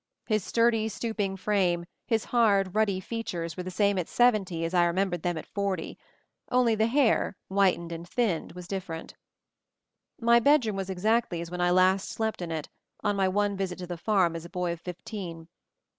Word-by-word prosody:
His 215 -4 +1
sturdy, 230 -1 +2
stooping 210 -4 -2
frame, 185 -4 +1 0.2
his 225 -2 +1
hard, 200 -6 +3
ruddy 210 -3 +2
features 180 -6 -4
were 180 - -4
the 180 - -5
same 200 +1 +2
at 175 - -2
seventy 195 -9 +2
as 165 - -4
I 175 -1 +4
remembered 175 0 0
them 175 -1 -1
at - - -6
forty, 200 -4 -3 0.6
only 250 -2 +4
the 220 +1 +2
hair, 235 -5 +2
whitened 190 -3 +2
and 170 +1 -7
thinned, 210 -10 -1
was 180 0 -9
different. 180 -4 -5 1.1
My 235 0 +5
bedroom 250 -5 +3
was 195 -1 -4
exactly 205 0 +1
as 170 0 -6
when 180 0 -3
I 175 - +3
last 185 +2 +3
slept 220 -3 -2
in 175 - -4
it, 155 -2 -3 0.4
on 205 0 +1
my 195 -1 +2
one 205 +1 +1
visit 190 -2 -3
to 180 - -6
the 175 0 -5
farm 180 -2 +2
as 165 - -5
a 170 - -10
boy 180 -2 -2
of 170 - -10
fifteen. 180 -2 -7
190 Hz, 190 wpm, -28 LUFS, 175-220 Hz, 1.1 s, My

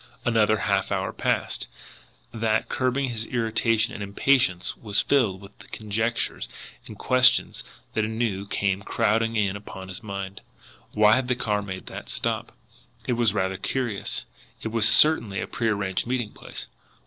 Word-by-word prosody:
Another 110 -2 +3
half - - 0
hour - - -1
passed, - - -1 0.7
that, 110 -1 0
curbing 130 +1 0
his 115 -1 -4
irritation 115 -1 +1
and - - -7
impatience, 100 -2 +2
was 105 -3 -1
filled 115 -10 +2
with 100 +1 -13
the - - -14
conjectures 110 +2 -2 0.4
and - - -10
questions 130 -1 +3 0.3
that 110 - +1
anew 110 -3 -2
came 100 -1 0
crowding 115 +3 +1
in 100 -3 +1
upon 95 -2 -9
his 90 - -7
mind. 100 -2 -6 0.5
Why 105 +1 +5
had 130 -1 -1
the 125 - +1
car 105 -4 -1
made 95 -2 -7
that - - -8
stop? - - -2 0.5
It 125 - 0
was 115 -3 +2
rather 95 -1 0
curious. 120 0 -2 0.4
It 110 - -2
was 110 -1 +4
certainly 115 -7 +5
a - - -2
prearranged 105 -3 -1
meeting 120 -4 -1
place. - - -8
110 Hz, 150 wpm, -25 LUFS, 100-120 Hz, 0.7 s, Why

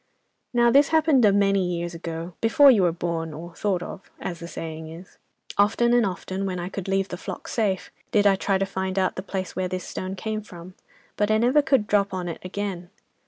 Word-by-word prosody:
"'Now 240 -1 +4
this 280 +2 +6
happened 315 -5 +3
a 205 - +6
many 195 -1 +3
years 175 -1 -3
ago, 165 +1 -6
before 275 +5 +7
you 220 -6 +4
were 175 -2 +3
born, 165 -2 -3
or 170 +2 -9
thought 185 -1 -1
of, 195 - -9
as 170 -2 -5
the 170 - -7
saying 160 -1 -6
is. 170 +3 -12 0.4
Often 235 +4 +3
and 240 -3 +4
often, 190 +1 -4
when 185 -1 -3
I 175 +1 -4
could 195 -1 -6
leave 195 0 0
the 180 - -5
flock - - -7
safe, 200 -5 -1 0.2
did 205 -1 +3
I 200 -1 +6
try 195 0 0
to 195 - 0
find 190 0 -3
out 190 -1 +1
the - - -4
place 190 -1 -5
where 185 -1 -1
this 185 0 -4
stone 185 +1 -5
came 215 +2 -3
from, 180 -3 -12 0.4
but 210 0 +1
I 215 - +4
never 250 +6 +4
could 270 -6 +2
drop 200 -2 +1
on 180 -1 -3
it 165 - -5
again. 185 -2 -4
190 Hz, 220 wpm, -25 LUFS, 175-210 Hz, 0.4 s, before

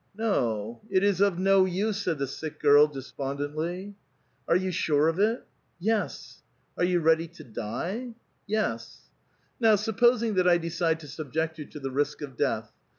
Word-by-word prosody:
" 195 - -32
No; 115 - -1
it 190 -1 +2
is 200 -2 +2
of 200 -3 +3
no 195 0 +4
use," 200 +3 -1
said 175 -5 -1
the 140 - -1
sick 155 +3 -7
girl, 145 +1 +6
despondently. 145 +7 -4 0.3
" - - -42
Arc 170 - +4
you 185 0 -2
sure 155 -3 +2
of 165 +3 0
it? 220 +4 +1 0.2
" - - -43
"Yes." 215 - -4 0.2
" - - -42
Are - - +2
vou 180 0 +2
ready 165 0 +3
to 170 - -14
die? 175 - -5
" - - -43
"Yes." 115 - -3 0.2
" - - -41
Now 225 -3 +5
supposing 225 +2 +2
that 185 -2 +2
I 175 - +5
decide 165 -1 -1
to 150 - -10
subject 160 +2 -3
you 150 - -5
to 150 - -10
the 135 -1 -4
risk 145 +2 -1
of 135 -3 -7
death. 110 -2 -1
170 Hz, 195 wpm, -27 LUFS, 145-200 Hz, 0.3 s, girl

